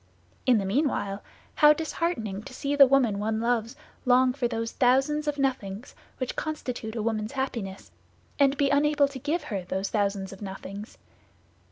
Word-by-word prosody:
In 250 -3 +6
the 200 - -1
meanwhile, 205 -3 0 0.3
how 300 -1 +7
disheartening 300 - -2
to 255 - -9
see 280 +2 -1
the 280 -1 +8
woman 250 -7 +3
one 220 +1 -1
loves 230 +1 0 0.3
long 255 0 +4
for 255 -2 0
those 230 -1 -3
thousands 270 +4 +2
of 295 -1 -1
nothings 250 -5 -2 0.2
which 255 -2 -3
constitute 250 -7 -4
a 220 - -2
woman's 215 0 -2
happiness, 230 -8 -4 0.5
and 280 0 +4
be 280 -2 +2
unable 290 0 +3
to 275 -1 -8
give 305 +6 -1
her 200 -4 -3
those 190 +2 -3
thousands 200 -2 -1
of 195 - -13
nothings. 195 +2 -8
245 Hz, 165 wpm, -27 LUFS, 210-280 Hz, 0.5 s, the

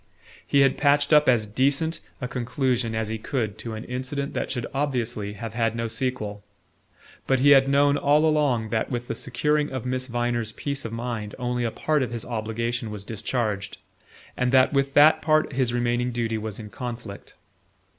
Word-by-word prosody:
He 140 - +4
had 135 -1 +3
patched 145 +1 +3
up 150 -2 +6
as 115 -4 +3
decent 140 +9 0 0.2
a 125 - -3
conclusion 125 -2 -1
as 110 -1 -2
he 110 0 -3
could 110 -4 -3
to 115 -1 -5
an 110 - -6
incident 130 +3 -4
that - - -2
should 120 -3 -3
obviously 120 -7 -2
have 110 +1 -7
had 115 -1 0
no 115 0 -2
sequel; 110 -4 -3 0.8
but 135 - +3
he 145 +2 +5
had 135 -1 +6
known 140 +1 +4
all 150 +2 +4
along 145 -8 +2
that 110 - 0
with 120 -1 -3
the - - -2
securing 150 +4 0
of 130 -2 -4
Miss 130 0 -2
Viner's 120 -2 -1
peace 140 -2 -4
of 115 - -4
mind 115 -3 -4
only 125 -1 -2
a - - +1
part 150 +5 0
of 125 - -1
his 115 -1 -5
obligation 115 +1 -3
was 105 -2 -7
discharged, 105 -2 -2 0.6
and 125 0 0
that 130 +2 +5
with 140 0 +1
that 150 +2 +7
part 155 -1 +2
his 130 -2 +1
remaining 120 0 0
duty 115 -2 -1
was 105 -1 -5
in 105 -2 -9
conflict. 115 -4 -7
120 Hz, 185 wpm, -25 LUFS, 115-135 Hz, 0.8 s, that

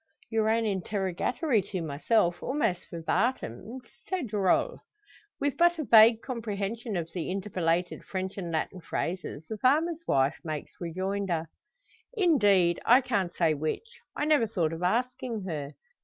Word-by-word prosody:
Your 220 -1 +2
own 225 +1 +2
interrogatory 205 - 0
to 190 0 -5
myself 170 +4 +1
almost 190 -10 -1
verbatim 215 - -2 0.3
c'est 375 -4 -1
drole!" 210 - +1 0.6
With 285 0 -1
but 345 0 +4
a 310 - -2
vague 225 -1 +7
comprehension 220 -2 -3
of 165 -1 -4
the 175 -2 -3
interpolated 180 -3 -1
French 190 0 -4
and 175 -4 -5
Latin 165 +3 -2
phrases, 165 -2 -4
the 220 - -5
farmer's 315 +7 +2
wife 135 +2 +2
makes 155 -3 -5
rejoinder: 180 -1 -2 0.7
"Indeed, 205 - +4
I 250 +3 +6
can't 200 -9 -1
say 165 -3 +3
which. 155 - -4 0.2
I 295 - -1
never 300 -7 +3
thought 175 -7 -1
of 165 - -6
asking 240 +3 -1
her. 150 -5 -4
200 Hz, 140 wpm, -28 LUFS, 175-240 Hz, 0.7 s, vague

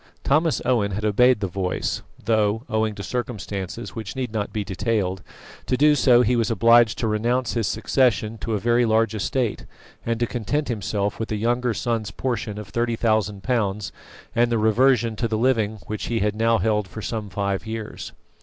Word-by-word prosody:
Thomas 155 +3 +2
Owen 105 -6 +1
had 105 +2 -3
obeyed 120 +3 +4
the 100 - 0
voice; 90 0 -2 0.2
though, 110 0 +1
owing 110 -1 0
to 100 - -7
circumstances 110 -3 -4
which 110 -3 -6
need 125 -4 -3
not 105 -2 -2
be 105 - -2
detailed, 95 -1 -1 0.5
to 125 - +1
do 150 +3 +5
so 125 -4 +5
he 125 +2 +2
was 115 -3 +1
obliged 115 +1 +5
to 115 - -1
renounce 120 +3 0
his 115 -3 0
succession 115 -2 +1
to 110 +2 -3
a - - -1
very 120 +3 +2
large 115 0 +2
estate, 115 +2 -2 0.4
and 115 -1 -1
to 120 - +2
content 130 +6 -2
himself 105 -2 -2
with 115 - -4
a - - 0
younger 120 +2 0
son's 115 -5 -1
portion 110 +2 -3
of 105 -2 -8
thirty 120 +2 0
thousand 110 -3 0
pounds 105 -5 -1 0.4
and 120 0 +3
the 115 - +2
reversion 115 +1 +3
to 115 - 0
the 110 -1 -1
living 110 -3 +1
which 105 -1 -4
he 120 - -1
had 105 -1 0
now 115 +1 +3
held 105 -3 0
for 110 +3 -8
some 110 -3 -4
five 100 +2 -2
years. 110 -1 -6
110 Hz, 190 wpm, -23 LUFS, 105-120 Hz, 0.5 s, do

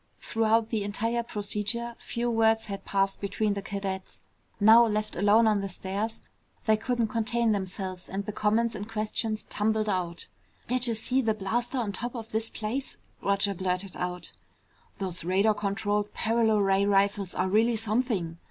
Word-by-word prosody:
Throughout 225 0 +1
the 220 -3 0
entire 225 +4 0
procedure 215 +1 -2
few 235 +1 -3
words 225 -1 +3
had 200 -1 -6
passed 195 0 0
between 205 +1 0
the 200 - -3
cadets. 195 -1 -5 0.4
Now 220 +3 +8
left 215 -1 -1
alone 205 +5 +5
on 210 -2 +3
the 195 - -3
stairs, 200 +5 -3 0.4
they 220 - +5
couldn't 235 0 -1
contain 230 +1 +1
themselves 190 -2 -4
and 195 +1 -3
the 210 - -3
comments 220 +3 +1
and 210 0 -6
questions 215 0 -2
tumbled 215 +1 +1
out. 175 -3 -2 0.4
"Did'ja 245 -1 +1
see 255 +4 +1
that 220 -3 0
blaster 240 +6 -1
on 225 -5 -1
top 240 +6 -5
of 225 -1 -7
this 220 +1 0
place?" 235 +6 -4 0.2
Roger 200 0 +1
blurted 185 +1 -2
out. 180 0 -4 0.7
"Those 185 -4 -4
radar 195 +5 +3
controlled 205 0 -1
paralo 225 -1 +2
ray 195 0 +3
rifles 200 -1 +2
are 185 - +1
really 225 +4 +3
something!" 215 -6 -1
210 Hz, 160 wpm, -28 LUFS, 195-225 Hz, 0.7 s, Now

